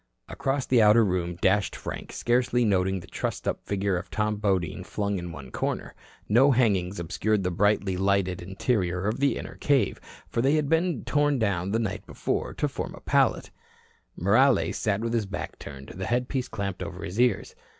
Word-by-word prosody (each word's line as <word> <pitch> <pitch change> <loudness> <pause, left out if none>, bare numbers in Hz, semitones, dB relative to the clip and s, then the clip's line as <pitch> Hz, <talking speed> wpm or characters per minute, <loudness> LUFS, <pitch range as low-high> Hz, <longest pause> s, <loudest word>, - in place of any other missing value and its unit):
Across 135 0 -1
the 125 -3 +4
outer 110 +1 +6
room 90 -2 -1
dashed 95 +3 +1
Frank, - - -6
scarcely 120 0 +1
noting 95 -2 +1
the - - -12
trussed - - -4
up - - -2
figure 100 -2 0
of 95 - -6
Tom 105 -1 -1
Bodine 95 -6 -1
flung 100 -2 -2
in 85 0 -6
one 70 -5 -9
corner. - - -3 0.3
No 125 +7 +5
hangings 100 -8 +2
obscured 100 +5 0
the 90 - 0
brightly 100 0 +1
lighted 95 -2 +1
interior 95 -1 -1
of 105 +5 -1
the 140 0 +2
inner - - -8
cave, 140 -3 +1 0.3
for 115 - -1
they 135 +4 +3
had 150 -2 +1
been 165 -3 +1
torn 145 -1 +2
down 100 -5 0
the 110 - +1
night 110 -4 -2
before - - -2
to - - 0
form - - -5
a - - -13
pallet. - - +1 0.7
Morales 120 +9 +3
sat 105 -1 0
with 115 0 -2
his 110 -4 0
back 95 - -6
turned, 70 -1 -9
the 95 +1 -5
headpiece 125 +2 -1
clamped 100 -4 -4
over 90 -1 -6
his 100 +3 -5
ears. 125 - +2
100 Hz, 185 wpm, -26 LUFS, 95-120 Hz, 0.7 s, outer